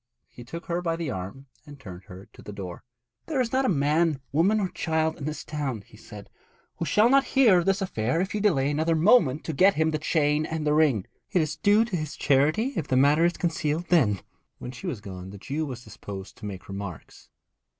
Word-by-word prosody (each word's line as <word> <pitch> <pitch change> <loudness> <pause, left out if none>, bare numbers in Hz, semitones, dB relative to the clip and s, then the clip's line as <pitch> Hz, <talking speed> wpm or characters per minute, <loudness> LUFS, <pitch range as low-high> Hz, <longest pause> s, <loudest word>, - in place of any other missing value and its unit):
He 120 - -12
took 165 +8 -8
her 175 +1 -2
by 165 -2 -1
the 165 -4 -3
arm 95 +9 -7 0.2
and 145 -1 -12
turned 95 -7 -10
her 95 +2 -12
to - - -14
the - - -9
door. 95 -3 -8 0.4
'There 300 -5 -1
is 245 -3 0
not 265 +1 +2
a - - +2
man, 155 -1 +2
woman 185 +9 +3
or 190 -3 -1
child 160 -1 -1
in 140 - -5
this 155 -1 -4
town,' 135 -8 -4
he - - -18
said, 105 -1 -12 0.5
'who 165 - -2
shall 210 +9 +4
not 270 +2 +5
hear 220 -9 +6
of 175 - -3
this 195 0 +2
affair 125 - -1
if 190 +2 -2
you 210 - -1
delay 145 -9 +2
another 160 +3 +1
moment 160 - +4
to 160 - -4
get 190 +7 +4
him 160 +1 +1
the 155 - -1
chain 150 -1 +1
and 160 -1 -3
the 150 - +2
ring. 145 -10 +3 0.3
It 180 - +3
is 155 0 -4
due 205 +6 +3
to 215 -5 -4
his 155 -3 -4
charity 155 - +2
if 150 - -2
the 130 - +1
matter 145 +5 +4
is 175 - +2
concealed 165 -1 -1
then.' 120 - +3 0.4
When 125 - -7
she 120 - -8
was 110 - -4
gone 95 -2 -8
the 100 - -10
Jew 150 +9 -3
was 125 -3 -7
disposed 100 -3 -9
to 105 - -7
make 95 -2 -8
remarks. 95 -6 -8
155 Hz, 230 wpm, -26 LUFS, 125-170 Hz, 0.5 s, hear